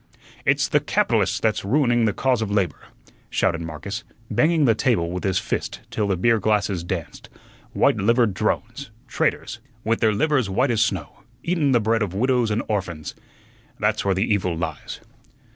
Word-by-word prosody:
"It's -, -, +3 dB
the -, -, +3 dB
capitalists -, -, +1 dB
that's 110 Hz, -1 st, 0 dB
ruining 120 Hz, +1 st, +2 dB
the 105 Hz, -, +2 dB
cause 125 Hz, +2 st, 0 dB
of 110 Hz, -, -2 dB
labor," 100 Hz, -3 st, -1 dB, 0.4 s
shouted 85 Hz, -1 st, 0 dB
Marcus, 85 Hz, +7 st, -6 dB, 0.3 s
banging 155 Hz, +6 st, +3 dB
the 115 Hz, -, +5 dB
table 105 Hz, -7 st, +1 dB
with 90 Hz, 0 st, -4 dB
his 95 Hz, -2 st, +1 dB
fist -, -, -3 dB
till 105 Hz, -, -1 dB
the 95 Hz, -2 st, 0 dB
beer 115 Hz, +5 st, +3 dB
glasses 105 Hz, -4 st, 0 dB
danced; 85 Hz, -2 st, -6 dB, 0.4 s
"white -, -, +3 dB
livered 115 Hz, +1 st, +2 dB
drones, 115 Hz, +6 st, -2 dB, 0.2 s
traitors, 110 Hz, -, -1 dB, 0.2 s
with 115 Hz, +1 st, 0 dB
their 110 Hz, -, +3 dB
livers 130 Hz, +1 st, +1 dB
white 125 Hz, +7 st, +1 dB
as 115 Hz, -2 st, +1 dB
snow, 95 Hz, -8 st, -2 dB, 0.3 s
eatun 165 Hz, -5 st, +1 dB
the 120 Hz, -, +4 dB
bread 115 Hz, +1 st, +1 dB
of 95 Hz, -3 st, -2 dB
widows 125 Hz, +1 st, +2 dB
and 110 Hz, +2 st, 0 dB
orphuns; 85 Hz, -8 st, -3 dB, 0.7 s
there's -, -, +1 dB
where 100 Hz, -1 st, +1 dB
the 95 Hz, +4 st, +1 dB
evil 90 Hz, -5 st, 0 dB
lies." 80 Hz, -3 st, -5 dB
105 Hz, 170 wpm, -23 LUFS, 95-120 Hz, 0.7 s, the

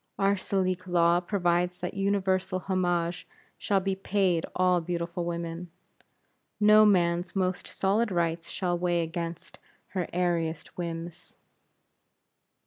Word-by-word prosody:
Our 195 Hz, 0 st, +3 dB
Salique 185 Hz, -1 st, -1 dB
Law 170 Hz, -1 st, +4 dB
provides 180 Hz, -1 st, 0 dB
that 180 Hz, -, -4 dB
universal 195 Hz, -1 st, 0 dB
homage 175 Hz, -2 st, -1 dB, 0.3 s
shall 200 Hz, -1 st, +1 dB
be 195 Hz, +1 st, -1 dB
paid 190 Hz, -3 st, 0 dB
all 180 Hz, -1 st, +3 dB
beautiful 170 Hz, +1 st, -3 dB
women. 170 Hz, 0 st, -4 dB, 0.9 s
No 215 Hz, 0 st, +7 dB
man's 175 Hz, -2 st, +2 dB
most 185 Hz, -1 st, -1 dB
solid 210 Hz, +4 st, +1 dB
rights 170 Hz, -1 st, -1 dB
shall 180 Hz, -2 st, -1 dB
weigh 175 Hz, -1 st, +1 dB
against 165 Hz, +1 st, -6 dB, 0.3 s
her 185 Hz, -3 st, -2 dB
airiest 170 Hz, -3 st, -1 dB
whims. 170 Hz, 0 st, -6 dB
180 Hz, 115 wpm, -28 LUFS, 170-190 Hz, 0.9 s, No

